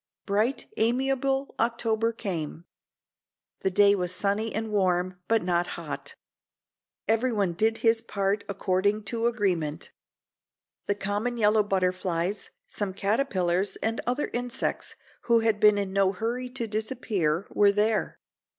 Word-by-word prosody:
Bright, 215 +6 0
amiable 270 +3 +1
October 230 -1 +1
came. 170 -7 -5 0.9
The - - 0
day 200 +1 +5
was 180 -3 -1
sunny 205 +4 0
and 220 0 -3
warm, 185 -2 +1
but 225 -3 +2
not 175 -1 +1
hot. - - -6 0.9
Everyone 220 -5 +1
did 220 +6 +1
his 225 0 +4
part 200 -2 -1
according 200 +2 0
to 230 +2 0
agreement. 180 -10 -1 1.0
The 205 - +1
common 205 +5 -2
yellow 215 -1 +4
butterflies, 185 -1 -1 0.2
some 195 -3 -4
caterpillars 195 -4 0
and 225 +1 -2
other 250 +4 -1
insects 245 0 -2 0.3
who 235 -1 +4
had 225 -2 +1
been 210 -1 +6
in 195 -2 -2
no 195 -1 +3
hurry 240 +5 -3
to 245 -2 -3
disappear, 210 -6 -1
were 205 -1 +5
there. 210 +1 0
210 Hz, 125 wpm, -27 LUFS, 190-230 Hz, 1.0 s, been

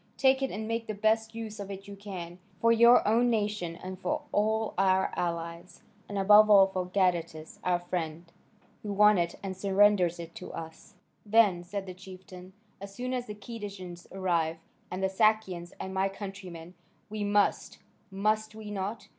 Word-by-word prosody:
Take 265 0 +4
it 270 - 0
and 215 +1 -5
make 230 0 -2
the 215 - -4
best 220 +2 +1
use 220 -2 -6
of 200 -1 -6
it 195 0 -8
you 200 - -8
can, 185 -3 -8 0.2
for 230 - +4
your 235 0 +6
own 235 +3 +3
nation, 210 -6 -1
and 185 +1 -8
for 300 +8 -2
all 220 +1 +1
our 190 0 +2
allies, 170 +1 -4 0.3
and 205 - -4
above 210 +2 +7
all 200 -2 +8
for 185 -1 -3
Gadatas, 170 -4 -1
our 180 -1 +2
friend, 175 -2 -4 0.6
who 210 - -5
won 210 -1 +5
it 170 0 -1
and 190 -1 -4
surrenders 195 -2 +3
it 170 0 -8
to 180 - -9
us." 160 -1 -9 0.3
"Then," 205 -5 +3
said 195 +2 -5
the 185 - -7
chieftain, 185 0 -12 0.3
"as 200 0 -9
soon 250 +1 -3
as 250 -1 -3
the 210 - -6
Cadousians 200 -5 -8
arrive 170 -4 0 0.3
and 185 +1 -4
the - - +4
Sakians 190 -3 +1
and 190 - -5
my 190 +1 +1
countrymen, 190 -4 -9 0.3
we 215 0 -4
must, 205 0 +1 0.3
must 215 +2 -1
we 215 -1 -8
not? 200 +2 -4
195 Hz, 175 wpm, -29 LUFS, 180-215 Hz, 0.6 s, all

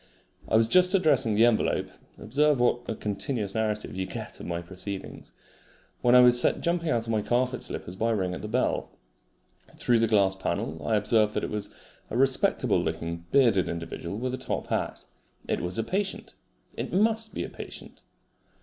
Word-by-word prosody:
I - - +1
was 110 0 +5
just 180 - +5
addressing 145 - +3
the 110 +3 +6
envelope 120 -2 +1 0.3
(observe 145 +5 +1
what 120 0 +1
a 115 - -2
continuous 105 0 -3
narrative 105 -3 -2
you 95 0 -3
get - - -7
of - - -8
my 85 -1 -2
proceedings!) 95 +2 -8 0.7
when 120 0 +5
I 125 - +9
was 125 0 +5
set - - +2
jumping 170 -1 0
out 115 -6 0
of 115 - -3
my 110 -1 +1
carpet 125 +3 0
slippers 90 - -6
by 115 +4 0
a 115 - +2
ring 95 -3 -1
at - - -6
the 105 - -5
bell. 125 +4 0 0.9
Through 120 -1 +2
the 115 - +3
glass 100 -3 +3
panel 80 -4 -3
I 110 - +2
observed 105 0 +2
that - - -1
it - - -3
was 105 -1 -3 0.4
a 115 - -3
respectable 135 0 +3
looking 85 0 -4
bearded 115 -9 +4
individual 85 +3 -5
with 125 +2 -3
a - - -2
top 130 - -3
hat. - - -2 0.4
It - - -1
was 90 +1 0
a 115 - +1
patient. 195 - -3 0.4
It - - -4
MUST 220 +3 +1
be - - -2
a - - -6
patient! - - -10
115 Hz, 190 wpm, -27 LUFS, 100-130 Hz, 0.9 s, I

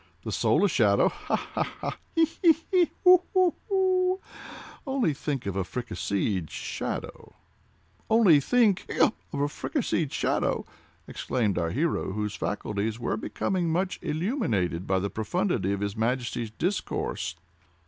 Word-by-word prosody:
The - - -4
soul - - +3
a - - +5
shadow; - - +3
Ha! - - -3
ha! - - -2 0.2
ha!—he! 330 -1 0 0.2
he! 335 -4 +7 0.2
he!—hu! 365 0 +5
hu! 370 -2 +4 0.2
hu! 375 -1 +2 0.7
Only 265 - +1
think 140 -3 -3
of 100 -2 -3
a 95 - 0
fricasseed 100 - -2
shadow!" - - -5 0.7
"Only 215 -9 +6
think—hiccup!—of 210 - +1
a 145 - +2
fricasséed 160 - -2
shadow!" - - 0 0.4
exclaimed 110 -8 -1
our 85 -1 0
hero, 145 - -1
whose 105 0 -2
faculties 105 +2 -2
were 120 - -1
becoming 175 - -1
much 180 +3 -1
illuminated 155 - -1
by 95 - +2
the 100 +2 -2
profundity 140 - -1
of 100 0 -2
his 100 0 -2
Majesty's 120 0 -1
discourse. 175 - -2
145 Hz, 130 wpm, -27 LUFS, -, 0.7 s, he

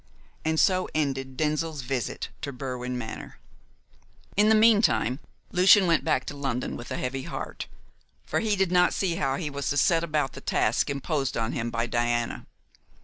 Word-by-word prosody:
And 160 0 +1
so 185 -1 +3
ended 135 -3 -2
Denzil's 155 -1 -1
visit 125 -3 -3
to 140 - -4
Berwin 125 -1 -4
Manor. 110 -2 -7 1.0
In 210 +2 +4
the 220 - +6
meantime, 215 - +4 0.3
Lucian 185 +2 +6
went 165 -3 +2
back 130 - +1
to 145 - -6
London 135 -3 -3
with 120 - -8
a - - -3
heavy 130 +1 -3
heart, - - -6 0.6
for - - 0
he 215 -2 +1
did 190 -2 +1
not 180 0 +4
see 175 -4 0
how 135 -2 0
he 150 -1 -4
was 140 -1 -3
to 145 - 0
set 165 +3 +3
about 150 -5 -1
the - - -9
task - - +1
imposed 140 0 -2
on 115 +1 -1
him 120 0 -2
by 115 0 -1
Diana. 120 0 -1
140 Hz, 175 wpm, -26 LUFS, 125-170 Hz, 1.0 s, the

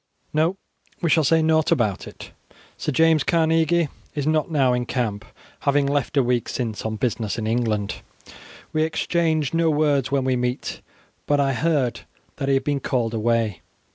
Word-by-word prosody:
No; 160 +5 +1 0.4
we 170 -3 0
will 160 - +3
say 160 +3 +3
nought 160 0 +2
about 105 -6 0
it. - - -11 0.4
Sir - - -3
James 160 +1 +4
Carnegie 165 0 +2 0.3
is 145 -2 -2
not 155 +1 +1
now 135 -5 +2
in 125 -1 -1
camp, 110 -5 -2 0.4
having 140 0 +2
left 140 0 -1
a 135 - +5
week 120 -1 0
since 115 -4 -3
on 110 - -3
business 110 -3 -2
in 110 - -3
England. 110 -3 -1 0.8
We 155 - +1
exchange 160 -2 0
no 165 0 +2
words 145 -4 +1
when 140 -1 +1
we 130 0 +1
meet, 125 +1 -3 0.5
but 145 0 +2
I 135 -1 +2
heard 145 -3 0 0.4
that 135 - -3
he 135 - +3
had 135 - +1
been 145 0 0
called 120 -4 -1
away. 110 -5 0
140 Hz, 170 wpm, -23 LUFS, 120-155 Hz, 0.8 s, a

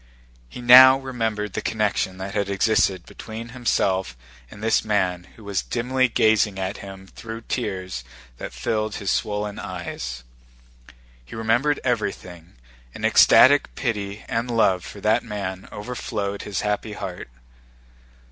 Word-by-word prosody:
He 125 - -9
now 130 +2 +9
remembered 110 -6 -3
the - - -3
connection 105 -4 -1
that 95 +2 -6
existed 100 -2 +1
between 115 +1 -9
himself 95 - -1 0.3
and 105 - -12
this 110 0 +2
man 95 -5 0
who 110 - -15
was 100 -2 -2
dimly 130 +2 0
gazing 110 -3 +2
at 95 0 -3
him 95 -1 -10
through 115 +3 -9
tears 95 - -4 0.3
that - - -7
filled 110 -1 -2
his 100 -2 -2
swollen 105 -1 -2
eyes. 85 -10 -6 1.0
He - - -11
remembered 115 +7 +1
everything, 90 - -3 0.4
and - - -4
ecstatic 145 +2 +6
pity 105 -5 -3
and 115 +2 -2
love 95 -6 +2
for 100 - -10
that 110 +3 +2
man 100 -4 -6
overflowed 105 -2 -4
his 100 -2 -3
happy 105 +1 -2
heart. 95 -8 -7
105 Hz, 130 wpm, -23 LUFS, 95-115 Hz, 1.0 s, now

